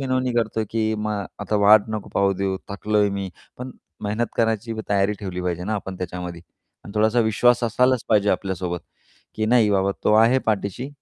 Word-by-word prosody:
विनवणी 130 -2 0
करतो 110 -1 0
की 110 -1 0
"मा 105 0 -2 0.3
आता 105 - -1
वाट 105 +1 +6
नको 110 -2 -5
पाहू 100 0 +3
देऊ, 95 0 -2
थकलोय 105 +1 +1
मी" 100 -1 -3 0.3
पण 125 +1 -6 0.3
मेहनत 110 +3 -1
करण्याची 115 0 0
पण 110 - -4
तयारी 100 0 +2
ठेवली 95 -3 -5
पाहिजे 90 0 -2
ना 110 +2 -2
आपण 95 -2 -5
त्याच्यामध्ये 90 -1 -6 0.4
आणि 100 - -10
थोडासा 110 +3 +3
विश्वास 120 +2 +3
असायलाच 125 +2 +2
पाहिजे 105 -2 +3
आपल्यासोबत 90 -2 -2 0.5
की 110 - -1
"नाही 115 -2 +4
बाबा 100 0 +2
तो 105 - +4
आहे 115 +4 +5
पाठीशी, 110 +4 -1
105 Hz, 180 wpm, -23 LUFS, 100-115 Hz, 0.5 s, वाट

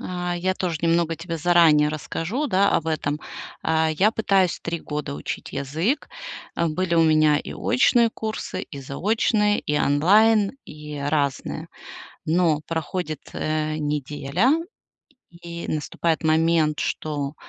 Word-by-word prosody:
А 180 -1 -3
я 185 +2 0
тоже 175 -5 -2
немного 165 -1 +2
тебе 165 0 -5
заранее 160 -3 +5
расскажу, 165 - -3
да, 200 -2 +3
об 165 - 0
этом. 150 -2 -1 0.4
А 160 0 +2
я 190 +8 +3
пытаюсь 195 -5 +1
3 170 -1 -4
года 150 -1 -4
учить - - -6
язык. 160 - -1 0.5
Э, 170 - +1
были 170 +2 -1
у 165 - +5
меня 155 -2 +4
и - - -7
очные 230 - +3
курсы, 220 -1 -5
и 140 -3 -8
заочные, 210 - +1
и 150 0 -1
онлайн, 205 - +4
и 150 -1 -9
разные. 140 -1 -2 0.6
Но 160 -2 +2
проходит, 165 -1 -3
э, 155 0 -1
неделя, 145 - 0 0.8
и 170 0 -8
наступает 155 +2 -1
момент, 160 -1 +2
что 145 -1 -3
165 Hz, 130 wpm, -23 LUFS, 150-180 Hz, 0.8 s, заранее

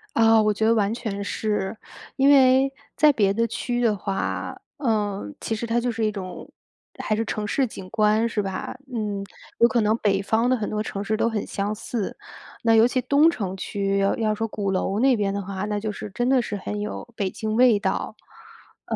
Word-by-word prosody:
啊， 225 -1 +5
我 210 0 +2
觉 220 +1 0
得 225 - +5
完 215 -1 +1
全 210 -4 -4
是。 210 0 -2 0.4
因 275 +1 +4
为 265 -1 +5 0.2
在 300 -1 +6
别 200 -6 +2
的 230 +3 +1
区 240 +2 -3
域 245 - 0
的 225 -3 +3
话， 195 0 -3 0.2
呃， 210 - -1
其 - - -2
实 225 +2 -3
它 230 +1 0
就 240 +1 +1
是 225 -1 -1
一 - - +2
种 185 -3 -7 0.5
还 - - 0
是 225 - -1
城 215 0 -3
市 260 +5 +1
景 190 -4 -10
观 215 +1 +2
是 215 - -1
吧？ 195 -1 -4 0.2
嗯， 210 -3 -2 0.4
有 235 - +7
可 240 -2 +1
能 210 +1 +2
北 195 -3 +1
方 225 +5 +1
的 255 - +4
很 215 -3 -3
多 210 0 -2
城 200 -2 -4
市 215 0 -1
都 225 - +2
很 220 -3 -2
相 205 +2 -2
似。 220 -1 -4 0.5
那 225 -1 +4
尤 225 +2 +6
其 255 +1 0
东 285 +6 +4
城 195 - -3
区 195 +1 -1
要 195 0 +2
要 215 -2 0
说 225 +1 -2
鼓 205 -2 -3
楼 195 +2 0
那 260 -2 +4
边 200 -2 0
的 200 - -2
话， 195 0 -4
那 210 0 -2
就 215 - -2
是 210 - -7
真 240 +5 -1
的 265 -1 +4
是 210 -3 -4
很 205 +1 -4
有 215 +3 -6
北 195 -2 0
京 215 +3 -4
味 245 -3 +6
道。 - - -2 0.7
呃， - - -2
215 Hz, 235 characters per minute, -24 LUFS, 200-235 Hz, 0.7 s, 有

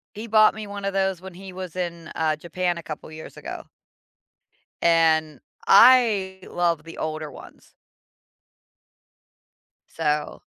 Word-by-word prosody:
He 220 +3 -7
bought 215 0 +5
me 215 -1 -7
one 200 0 -7
of 195 - -1
those 190 -2 0
when 190 -1 -10
he 190 +1 -10
was 185 -2 -7
in, 170 -2 -5
uh, 155 -1 0
Japan 175 +2 -2
a 170 - -10
couple 155 0 -8
years 155 0 -11
ago - - -8 1.2
and 160 -3 +3 0.3
I 210 -5 +5
love 170 -3 0
the 165 - -11
older 155 -1 -4
ones. - - -15 2.2
So 150 -2 -2
175 Hz, 130 wpm, -24 LUFS, 160-195 Hz, 2.2 s, bought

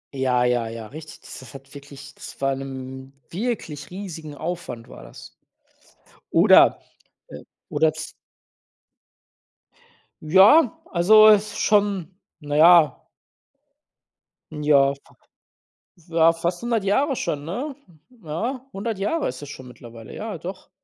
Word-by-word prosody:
Ja, 125 -2 +1
ja, 120 -2 0
ja, 115 0 -8
richtig. 155 +7 -12
Das - - -11
s 130 - -14
hat 135 +1 -13
wirklich 140 -1 -12
das - - -12
war 135 0 0
'nem 130 0 -8 0.2
wirklich 175 - -4
riesigen 170 -6 -8
Aufwand 155 -8 -6
war - - -13
das. - - -13 1.0
Oder, - - +6 0.5
äh - - -11 0.3
oder 160 -1 +1
z 155 0 -8 2.1
Ja, 195 - +5
also 215 +5 +6
ist 210 0 +2
schon, 200 -4 +1 0.3
na 145 -1 -5
ja. 165 0 +5 1.4
Ja, 145 -2 +2
fa - - -23 0.9
ja, 165 0 +4
fast 170 +4 -3
100 230 -4 -1
Jahre 270 +8 +1
schon, 145 -8 -3
ne? 255 - -5 0.5
Ja, 235 - -4
100 205 +1 -4
Jahre 290 +12 -1
ist 130 +3 -7
es 145 - -8
schon 130 -2 -10
mittlerweile, 115 -2 -13
ja, 210 -4 -6
doch. 185 +4 -9
160 Hz, 125 wpm, -22 LUFS, 135-200 Hz, 2.1 s, Oder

